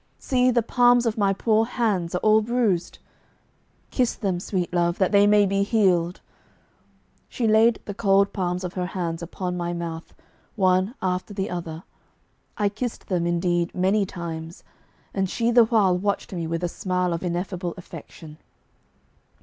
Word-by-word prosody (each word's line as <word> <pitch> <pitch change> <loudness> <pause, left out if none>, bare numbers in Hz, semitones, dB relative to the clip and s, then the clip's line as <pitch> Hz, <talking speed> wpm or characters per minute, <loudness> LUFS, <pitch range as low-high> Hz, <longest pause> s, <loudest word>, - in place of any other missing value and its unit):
See, 255 -1 +1
the 240 -2 +2
palms 245 +1 +4
of 225 -2 0
my 200 -2 +2
poor 220 +2 +2
hands 210 -8 -1
are 180 - -1
all 215 0 +5
bruised! 220 -6 0 0.9
Kiss 250 -3 +1
them, 190 -5 -2
sweet 180 -1 -3
love, 175 0 +1
that 190 0 +1
they 200 0 +5
may 205 0 +5
be 195 0 0
healed!' 185 -5 +1 1.1
She 235 - -1
laid 220 +1 +4
the 205 - -5
cold 200 -1 +2
palms 180 -1 -2
of 180 0 -4
her 180 -1 -2
hands 165 -2 -3
upon 180 +1 -4
ray 175 0 -2
mouth, 165 -1 -6 0.4
one 190 +2 +2
after 185 +2 -2
the 195 -1 -3
other. 170 -2 -5 0.7
I 210 - +2
kissed 220 +4 -5
them, 175 -3 0
indeed, 175 0 0
many 190 +3 +2
times, 165 -1 -7 0.5
and 190 -2 -1
she 235 +3 0
the 240 -1 +6
while 210 -5 +3
watched 200 +2 -2
me 170 -3 -3
with 165 +1 -3
a - - +1
smile 180 0 -1
of 165 - -3
ineffable 180 0 -3
affection. 160 -3 -11
190 Hz, 160 wpm, -24 LUFS, 175-215 Hz, 1.1 s, the